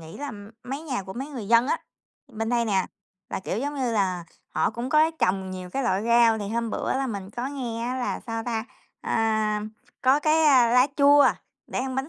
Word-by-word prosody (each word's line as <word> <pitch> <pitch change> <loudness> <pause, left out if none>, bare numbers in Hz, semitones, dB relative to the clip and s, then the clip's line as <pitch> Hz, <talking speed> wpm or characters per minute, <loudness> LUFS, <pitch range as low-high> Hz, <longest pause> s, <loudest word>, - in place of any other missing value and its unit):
nghĩ 160 0 -10
là 285 -1 -4 0.3
mấy 275 +5 -5
nhà 260 -10 -3
của 190 0 -8
mấy 265 +6 -5
người 240 -8 -7
dân 235 +1 +5
á, 485 - 0 0.5
bên 225 -2 -4
đây 240 -1 +2
nè, 195 -4 +1 0.4
là, - - -3
kiểu, 190 +2 -3
giống 290 +3 -3
như 255 -4 -1
là, 185 -5 0 0.2
họ 160 - 0
cũng 235 +3 -5
có 310 +3 +4
trồng 190 0 0
nhiều 185 -1 -7
cái 275 - -2
loại 200 -5 +1
rau. 235 -1 +4
Thì 205 -1 -4
hôm 230 0 -2
bữa - - -2
là 270 0 -1
mình 200 -4 -5
có 240 +4 -4
nghe 240 -5 -4
á 250 +1 -2
là, 250 - -2
sao 225 -1 -4
ta, 230 -2 -2 0.4
à, 215 -1 0 0.4
có 265 +3 +4
cái, 315 +1 +3
a, 255 -5 +6
lá 250 +2 +5
chua 285 0 +6 0.4
để - - -4
ăn 260 0 -2
bánh 265 +3 -2
235 Hz, 225 wpm, -25 LUFS, 210-270 Hz, 0.5 s, a